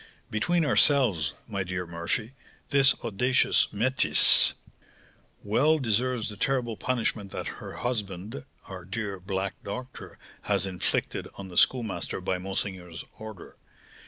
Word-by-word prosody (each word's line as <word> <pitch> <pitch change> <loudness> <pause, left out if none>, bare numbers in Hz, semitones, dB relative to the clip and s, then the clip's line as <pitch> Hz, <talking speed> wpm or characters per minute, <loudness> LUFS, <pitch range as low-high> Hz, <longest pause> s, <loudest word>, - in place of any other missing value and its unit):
"Between 165 +10 +1
ourselves, 125 - +3
my 100 -3 -3
dear 90 0 -4
Murphy, 85 +8 -3 0.4
this 135 -1 +6
audacious 125 +4 +2
métisse 130 +6 +6 0.9
well 145 +10 +3
deserves 125 -2 0
the 105 -2 -7
terrible 125 -2 -1
punishment 115 -4 -2
that - - -5 0.2
her - - -8
husband, 100 - -4 0.2
our 95 -2 -9
dear 100 +1 -5
black 95 +1 -3
doctor, 125 +5 -8 0.2
has 100 -2 0
inflicted 95 -2 -2
on 95 -1 -8
the 90 - -11
Schoolmaster 120 -6 +1
by 95 - -2
monseigneur's 90 -4 -5
order. 110 -5 -10
105 Hz, 120 wpm, -27 LUFS, 95-125 Hz, 0.9 s, this